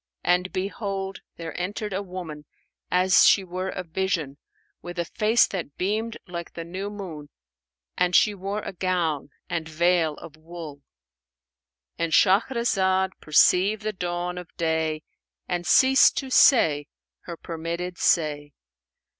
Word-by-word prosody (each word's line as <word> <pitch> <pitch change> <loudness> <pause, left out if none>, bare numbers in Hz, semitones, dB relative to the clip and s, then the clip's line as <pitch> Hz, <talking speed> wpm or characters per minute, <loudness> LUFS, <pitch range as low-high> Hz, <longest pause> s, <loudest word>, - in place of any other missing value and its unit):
And 180 +1 +1
behold, 195 0 -4 0.2
there 165 -2 -7
entered 205 +2 -4
a 190 - -1
woman, 175 -6 -8 0.4
as 185 0 +4
she 195 - +5
were 185 +1 -4
a 185 - -5
vision, 165 -5 -2 0.4
with 175 0 -8
a 170 - -1
face 220 +6 +3
that 170 -7 -6
beamed 215 +5 -2
like 170 -1 -7
the 165 - -5
new 185 +4 -5
moon; 175 -8 -8 0.7
and 180 0 +2
she 210 - +5
wore 200 +2 -4
a - - -6
gown 175 -6 -1 0.2
and 165 -3 -3
veil 165 -1 +2
of 155 0 -12
wool." 160 -3 -10 1.2
And 165 -1 -1
Shahrazad 190 -2 +2
perceived 190 +7 +3
the 215 0 -2
dawn 180 -1 -3
of 180 - -10
day 160 -1 -1 0.4
and 175 -1 -3
ceased 265 +6 +5
to 265 -1 -3
say 155 - +5 0.4
her 170 -1 -7
permitted 170 +2 -5
say. 145 -3 +1
180 Hz, 135 wpm, -25 LUFS, 165-195 Hz, 1.2 s, she